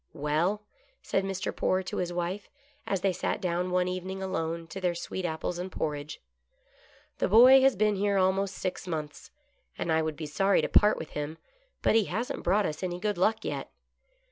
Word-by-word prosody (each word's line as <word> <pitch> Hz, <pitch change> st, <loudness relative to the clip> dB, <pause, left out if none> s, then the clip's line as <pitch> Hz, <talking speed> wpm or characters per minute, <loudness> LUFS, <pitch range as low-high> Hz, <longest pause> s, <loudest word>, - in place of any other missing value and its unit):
" -, -, -44 dB, 0.2 s
Well," 180 Hz, +8 st, +1 dB, 0.4 s
said 195 Hz, -, 0 dB
Mr. 195 Hz, +1 st, -3 dB
Poore 185 Hz, 0 st, +1 dB
to 185 Hz, -, -5 dB
his 175 Hz, -1 st, -1 dB
wife, 175 Hz, +3 st, -3 dB, 0.4 s
as 195 Hz, -2 st, -1 dB
they 195 Hz, -1 st, +2 dB
sat -, -, -2 dB
down 180 Hz, -1 st, -1 dB
one 180 Hz, 0 st, +1 dB
evening 185 Hz, +1 st, -4 dB
alone 165 Hz, -3 st, -2 dB
to 190 Hz, -, -7 dB
their 180 Hz, -2 st, 0 dB
sweet 180 Hz, +2 st, -4 dB
apples 170 Hz, +1 st, -3 dB
and 185 Hz, +1 st, -5 dB
porridge, 150 Hz, -2 st, -4 dB, 0.5 s
" -, -, -31 dB
the -, -, +2 dB
boy 250 Hz, +6 st, +8 dB
has 270 Hz, -1 st, +4 dB
been 210 Hz, +1 st, +2 dB
here 200 Hz, 0 st, +1 dB
almost 190 Hz, 0 st, +1 dB
six 185 Hz, 0 st, -4 dB
months, 155 Hz, -3 st, -5 dB, 0.5 s
and 165 Hz, -, -2 dB
I 160 Hz, 0 st, +3 dB
would 155 Hz, -1 st, -2 dB
be 160 Hz, -, -6 dB
sorry 195 Hz, +7 st, +2 dB
to -, -, +1 dB
part 210 Hz, 0 st, +4 dB
with 160 Hz, -, -7 dB
him, 150 Hz, +2 st, -4 dB, 0.5 s
but -, -, +4 dB
he 220 Hz, -2 st, +4 dB
hasn't 225 Hz, +8 st, -3 dB
brought 200 Hz, +3 st, +2 dB
us 150 Hz, -, -3 dB
any 180 Hz, -2 st, -2 dB
good 205 Hz, -1 st, -1 dB
luck 220 Hz, +4 st, +1 dB
yet. -, -, -4 dB
185 Hz, 200 wpm, -28 LUFS, 170-200 Hz, 0.5 s, boy